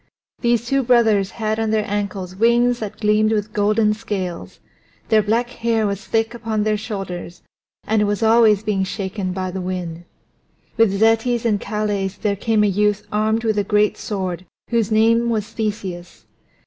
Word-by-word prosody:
These 235 -1 +1
two 275 +3 +1
brothers 225 -6 +3
had 220 -1 -2
on 225 -1 0
their 215 -1 +1
ankles 200 -3 -3
wings 240 +3 +3
that 215 0 -6
gleamed 215 0 +2
with 215 -1 -1
golden 210 +1 +2
scales; 195 -5 -5 0.5
their 220 -1 +5
black 230 +4 0
hair 230 -2 0
was 200 -1 -3
thick 225 +1 0
upon 225 -3 -2
their 215 0 +1
shoulders, 195 -5 -6 0.4
and 220 -1 +1
it - - +3
was 205 +2 -1
always 220 -2 +5
being 205 -3 0
shaken 190 0 -3
by 185 0 -3
the 190 +1 -4
wind. 175 -2 -5 0.7
With 225 -3 +4
Zetes 225 +2 +2
and 210 -3 +1
Calais 210 -2 -1
there 205 -2 0
came 215 +1 +1
a - - +3
youth 210 +1 +1
armed 220 +2 +1
with 215 -2 +1
a - - +1
great 210 +1 +2
sword 185 -5 -4 0.2
whose 230 -3 +1
name 230 +2 +3
was 215 -3 -1
Theseus. 195 -5 -5
210 Hz, 170 wpm, -20 LUFS, 200-225 Hz, 0.7 s, their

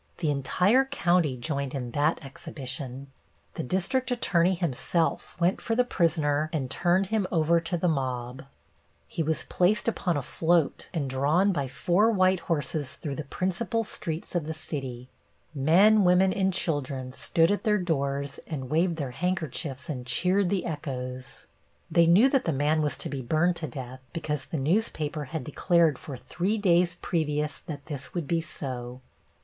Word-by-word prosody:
The 160 -4 0
entire 185 - +3
county 175 - +1
joined 140 +2 -3
in 125 -3 -4
that 150 +3 0
exhibition. 135 0 -7 0.4
The - - -4
district 195 - -1
attorney 185 -7 +2
himself 170 +1 -1
went 175 +2 +2
for 225 - -1
the 250 - +4
prisoner 155 -8 +1
and 135 -6 -2
turned 180 +2 +2
him 210 -4 +1
over 165 0 +3
to 175 +1 -2
the 180 - 0
mob. 130 -3 -2 0.6
He 75 - -4
was 160 0 0
placed 190 +6 +1
upon 180 -7 0
a 140 - -2
float 165 +2 +1
and 155 -6 -2
drawn 145 +9 +2
by 145 -7 -1
four 175 - +2
white 185 -4 +3
horses 150 -4 -2
through 145 -4 -5
the 155 - -4
principal 190 - -1
streets 165 -5 -6
of 170 -4 -1
the 160 - -3
city. 130 -5 -6 0.5
Men, 185 +9 +5
women 185 +1 +4
and 190 -1 +1
children 135 -7 -1
stood 165 +6 +2
at 205 - -1
their 210 -2 +3
doors 140 -5 -2
and 135 -5 -5
waved 170 +2 +2
their 140 -5 -4
handkerchiefs 155 -3 -2
and 125 -5 -5
cheered 180 +9 +2
the 195 -1 0
echoes. 130 -5 -5 0.5
They 170 -1 +5
knew 190 +10 +7
that 270 -1 +1
the 165 - +1
man 150 +3 +2
was 150 -1 -1
to - - -4
be 140 -2 -4
burned 160 +7 +1
to 160 - -4
death 130 -1 -7
because 150 -4 -3
the 160 - -4
newspaper 155 -1 0
had 155 +1 -5
declared 165 +1 +2
for 140 -4 -7
three 180 - -2
days 175 -3 +3
previous 150 -3 -1
that 145 -4 -8
this 140 -2 -7
would 170 -5 -2
be 165 +1 +1
so. 125 -5 -5
160 Hz, 165 wpm, -27 LUFS, 140-180 Hz, 0.6 s, knew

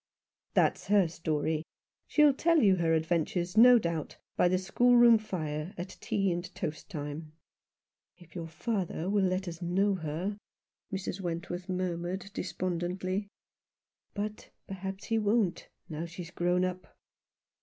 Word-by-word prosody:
" - - -59
That's - - +2
her 200 -3 +4
story. 155 -1 -1 0.5
She'll 300 -2 +5
tell 335 +4 +3
you 195 -3 +5
her 165 -2 +2
adventures, 170 +2 0
no 245 +2 +9
doubt, 170 -7 -3 0.2
by - - +4
the 185 +1 +2
schoolroom 240 +4 +5
fire, 160 -3 -4
at 180 +2 -6
tea 195 -2 0
and 175 0 -2
toast 155 +4 -5
time." 150 -2 -6 0.8
"If 175 -2 -18
your 170 -3 -5
father 175 +1 -2
will 205 -1 +3
let 185 +1 -1
us 170 0 -6
know 190 +4 +2
her/' 170 +5 -3 0.5
Mrs. 190 0 -4
Wenrworth 175 +1 -4
murmured, 185 +1 -3
despondently; 185 +2 -2 0.4
" - - -60
but 210 +1 -4 0.2
perhaps 190 0 -6
he 225 -1 +1
won't, 210 -3 +1 0.2
now 160 +1 -5
she's 175 0 -8
grown 180 +1 +1
up." 185 0 -6
180 Hz, 140 wpm, -30 LUFS, 170-200 Hz, 0.8 s, no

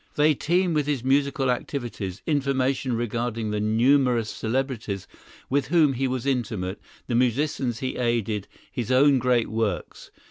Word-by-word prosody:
They 150 +1 +4
teem 175 +4 +1
with 150 -2 0
his 140 -5 -1
musical 135 -1 +2
activities—information 130 - -1
regarding 115 -1 -2
the 105 - -1
numerous 120 +1 +3
celebrities 115 -5 -3 0.4
with 140 -1 0
whom 155 -2 +4
he 135 +1 0
was 130 -1 -3
intimate, 110 -8 -2 0.2
the 120 - -3
musicians 125 0 0
he 130 - -3
aided, 115 -4 -1 0.2
his 120 -1 -3
own 135 +1 +5
great 125 -1 +2
works. 110 -1 -3
125 Hz, 135 wpm, -25 LUFS, 115-140 Hz, 0.4 s, own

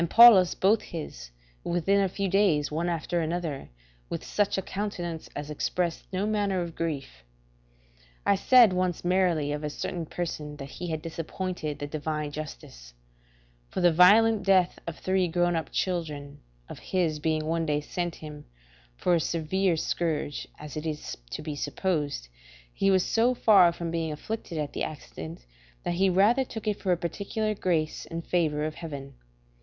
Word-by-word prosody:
Paulus 220 -6 +8
both 205 +4 +3
his, - - -7 0.3
within 185 +4 +2
a 195 - +1
few 195 +2 -2
days 180 -7 +2
one 165 +3 -1
after 170 +1 -1
another, 160 -3 -3 0.4
with - - -4
such 205 -1 0
a 190 - -1
countenance 175 -5 -4
as 145 +1 -5
expressed 170 +3 -2
no 190 +2 -1
manner 205 -3 0
of 170 -1 -7
grief. 140 - -4 1.0
I 200 - +5
said 230 +1 +6
once 180 -2 -1
merrily 175 -5 +2
of 150 +1 -3
a 150 - -1
certain 165 +2 -4
person, 150 -4 -4
that 140 -1 -8
he 175 - -6
had 160 -2 -3
disappointed 165 -1 -4
the 145 - -4
divine 150 0 -3
justice; - - -9 0.7
for - - -4
the 175 -1 +5
violent 210 +5 +6
death 190 -2 +3
of 170 - -5
three 185 -1 +1
grown 175 +1 +1
up 160 - -3
children 150 -6 -3 0.3
of - - -9
his 170 -5 -1
being 155 0 0
one 165 +1 0
day 150 -1 +1
sent 175 +3 -3
him, 150 -1 -10 0.5
for 180 - +2
a 170 - +4
severe 170 +3 0
scourge, 155 -3 -2
as 150 0 -9
it 155 +1 -4
is 150 -1 -4
to - - -5
be 150 -1 -4
supposed, 145 - -2 0.5
he 195 - +2
was 190 -1 +4
so 240 +3 +2
far 195 -7 +6
from 170 -1 -5
being 165 -1 -1
afflicted 170 +2 -5
at 150 -2 -3
the - - -2
accident, 80 - -7 0.4
that - - -1
he 190 +2 +3
rather 205 +8 +4
took 225 -4 -8
it 210 -1 0
for 190 - 0
a 175 - +3
particular 200 +5 -2
grace 165 -6 -1
and 165 0 -5
favour 155 -4 +1
of 155 - -3
heaven. 140 -5 -7
170 Hz, 170 wpm, -27 LUFS, 150-190 Hz, 1.0 s, Paulus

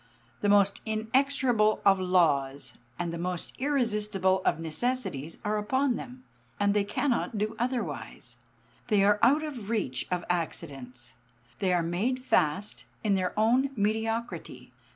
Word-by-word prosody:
The 205 - +2
most 200 -1 +4
inexorable 225 0 +2
of 195 -1 +6
laws, 150 -7 +1 0.2
and 170 -1 -3
the 170 - -4
most 180 0 -3
irresistible 210 -9 +1
of - - +2
necessities 165 - -3
are 210 0 +1
upon 260 +4 +1
them; 250 +2 -8 0.4
they 205 0 +3
cannot 235 +2 -1
do 215 +2 -1
otherwise; 190 - -4 0.5
they 210 -4 +3
are 205 +1 +4
out 285 +6 +4
of 305 -2 -4
the - - -7
reach 200 - -2
of 180 -1 -2
accidents; 135 -8 -4 0.5
they 190 - +1
are 175 -1 +2
made 190 +10 0
fast 185 +3 +1 0.2
in 210 -2 +2
their 185 -2 0
own 245 +5 +3
mediocrity. 225 +2 -2
205 Hz, 135 wpm, -28 LUFS, 175-235 Hz, 0.5 s, of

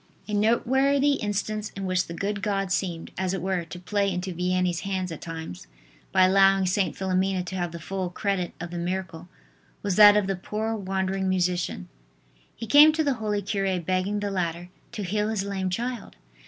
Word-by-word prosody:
A 210 - -5
noteworthy 265 +6 +3
instance, 210 +1 -2
in 195 - -4
which 185 0 0
the 170 - -7
good 200 +2 -2
God 195 -3 -1
seemed, 175 -4 -2
as 190 0 0
it 185 - -4
were, 190 -2 -1
to 175 +2 -9
play 200 +2 0
into 180 0 -3
Vianney's 180 0 0
hands 185 -2 -3
at 160 - -7
times, 160 - -7 0.4
by 185 -1 +5
allowing 195 0 +5
St. 185 +1 0
Philomena 190 0 0
to 185 +1 -6
have 175 -2 -2
the 170 - -7
full 185 +2 -3
credit 185 -1 -2
of 175 0 -6
the 175 - -4
miracle, 175 -1 -4 0.5
was 200 -3 -1
that 210 -1 +9
of 210 - +2
the 195 0 -1
poor 215 +4 -3
wandering 190 -1 -1
musician. 180 - -1 0.7
He 230 - -6
came 295 +7 +8
to 315 0 +1
the 285 -2 +1
holy 210 -1 -1
cure 195 -2 -1
begging 185 +4 -1
the 205 -1 -2
latter 175 -2 -3 0.2
to 215 -3 -4
heal 210 +3 -1
his 215 -3 -1
lame 195 -2 -2
child. 235 +4 -4
190 Hz, 190 wpm, -26 LUFS, 180-205 Hz, 0.7 s, that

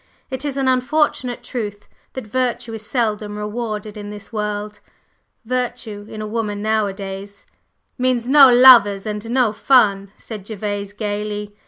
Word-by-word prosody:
It 260 +1 -3
is 285 -2 -3
an 270 -1 0
unfortunate 255 -1 0
truth 210 -5 -5 0.3
that 260 - -6
virtue 240 0 -2
is 220 -1 -6
seldom 210 -3 -2
rewarded 210 0 -4
in 205 0 -7
this 205 +1 -9
world. 210 -1 -3 0.7
Virtue 245 -4 -3
in 215 0 -6
a - - -4
woman 210 -1 -3
nowadays 200 -2 -3 0.3
" - - -46
"Means 250 -2 +1
no 275 -1 +8
lovers 240 -6 +7
and 210 +1 -4
no 245 -3 +2
fun!" 200 -5 +3
said 215 -4 -8
Gervase 205 -2 -4
gayly. 210 0 -4
215 Hz, 145 wpm, -20 LUFS, 205-245 Hz, 0.7 s, no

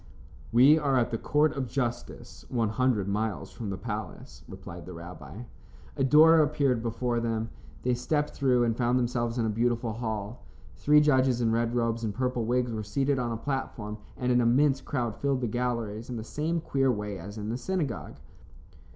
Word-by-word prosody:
"We 135 +7 +6
are 140 -3 +1
at 120 - +1
the 115 - -2
Court 150 +1 +2
of 135 -2 -2
Justice, 120 -1 -4
one 115 -4 0
hundred 110 -3 +1
miles 105 +1 -2
from 115 -4 -6
the 95 - -3
palace," 65 -7 -7
replied 85 -1 -10
the 90 - -7
rabbi. 85 - -9 0.5
A - - 0
door 155 +4 +7
appeared 140 -5 +2
before 120 +1 -1
them. 115 -1 -2 0.3
They 125 - +2
stepped 150 +5 -1
through, 125 -3 +2
and 115 -1 +1
found 120 +1 +1
themselves 120 -1 -1
in 115 - +1
a - - 0
beautiful 115 +1 0
hall. 110 -1 -4 0.3
Three 150 +1 +5
judges 130 -4 +3
in 115 -2 +2
red 115 +1 0
robes 115 -1 0
and 105 -3 -2
purple 125 -2 -1
wigs 125 +1 +1
were 110 - -3
seated 135 +6 0
on 120 -1 -1
a 115 - -2
platform, 115 -5 -4 0.2
and 125 0 0
an 125 0 +4
immense 135 +3 +3
crowd 120 -6 -3
filled 140 -2 0
the 120 - 0
galleries 115 -2 -2
in 125 - -4
the 110 - -5
same 160 +7 -2
queer 135 -3 +1
way 105 -3 -4
as 100 +6 -8
in 105 0 -4
the 115 - -2
synagogue. 160 -7 -3
120 Hz, 190 wpm, -28 LUFS, 110-130 Hz, 0.5 s, door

